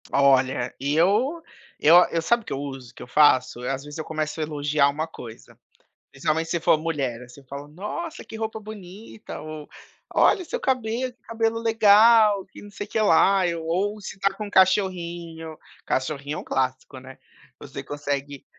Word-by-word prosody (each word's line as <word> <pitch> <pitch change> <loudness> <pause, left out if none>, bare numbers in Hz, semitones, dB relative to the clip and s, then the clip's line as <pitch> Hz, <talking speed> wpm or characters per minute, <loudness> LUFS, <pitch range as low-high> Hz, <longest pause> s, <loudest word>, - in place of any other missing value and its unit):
Olha, 135 -3 +2
e 140 +3 -1
eu 215 - +2 0.4
eu 155 +3 +6
eu 165 - -1
sabe 235 +7 +1
o - - 0
eu 135 - -3
uso, 135 -4 -7
o - - -32
que - - -10
eu - - -12
faço? 130 -3 +3
Eu, 125 - -2
às 135 0 -4
vezes, 150 +1 -9
eu 155 - -5
começo 155 0 -3
a - - 0
elogiar 150 -1 +1
uma 150 +3 -2
coisa. 115 -7 -12 0.5
Principalmente 155 +4 -1
se 170 - 0
for 160 - +3
mulher, 135 -7 -3
você 135 +3 -15
fala: 140 +2 -9
"Nossa 210 - -6
que - - -11
roupa 220 0 -4
bonita 210 0 -10
ou, 155 -1 -9 0.4
olha 370 - +4
seu 330 - -4
cabelo, 255 0 -1
que 245 - -43
cabelo 230 0 -1
legal, 220 -2 +5
que - - -14
não 205 - -12
sei 205 +1 -7
que 220 - -2
lá", 195 -1 +4 0.2
ou 195 +6 -2
se 195 - -8
tá 195 0 +1
com 210 +1 -6
cachorrinho, 175 -4 0 0.3
cachorrinho 145 +2 -2
é - - -4
um - - -8
clássico, 130 +1 -3
né. 130 +1 -13 0.4
Você - - -8
consegue 145 -1 -5
160 Hz, 180 wpm, -24 LUFS, 140-210 Hz, 0.5 s, eu